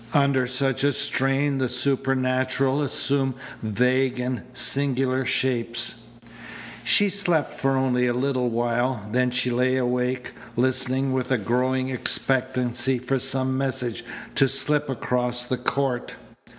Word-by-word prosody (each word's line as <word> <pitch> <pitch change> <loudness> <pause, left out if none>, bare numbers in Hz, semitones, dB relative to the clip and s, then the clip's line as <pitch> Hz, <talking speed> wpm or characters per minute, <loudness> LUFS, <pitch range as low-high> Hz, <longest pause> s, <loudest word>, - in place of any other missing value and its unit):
Under 140 -3 +3
such 135 +1 0
a 145 0 +3
strain 135 +2 +1
the 130 -1 0
supernatural 130 +1 +1
assumed 135 -2 +1 0.3
vague 125 +4 +1
and 125 -2 -2
singular 130 0 +2
shapes. 120 -2 0 0.8
She 160 - +5
slept 180 -6 0
for 135 0 0
only 125 -1 +1
a 120 - +1
little 130 -1 0
while. 120 0 -1
Then 125 +1 +2
she 125 0 -1
lay 130 +2 +1
awake, 125 0 -1 0.2
listening 130 +1 0
with 130 -1 -2
a 130 - +3
growing 130 +4 0
expectancy 130 0 0
for 125 +2 -1
some 130 0 0
message 130 -3 -2 0.3
to 135 - +3
slip 150 +2 +1
across 125 -1 -1
the 130 +1 -2
court. 125 0 -2
130 Hz, 125 wpm, -24 LUFS, 125-135 Hz, 0.8 s, She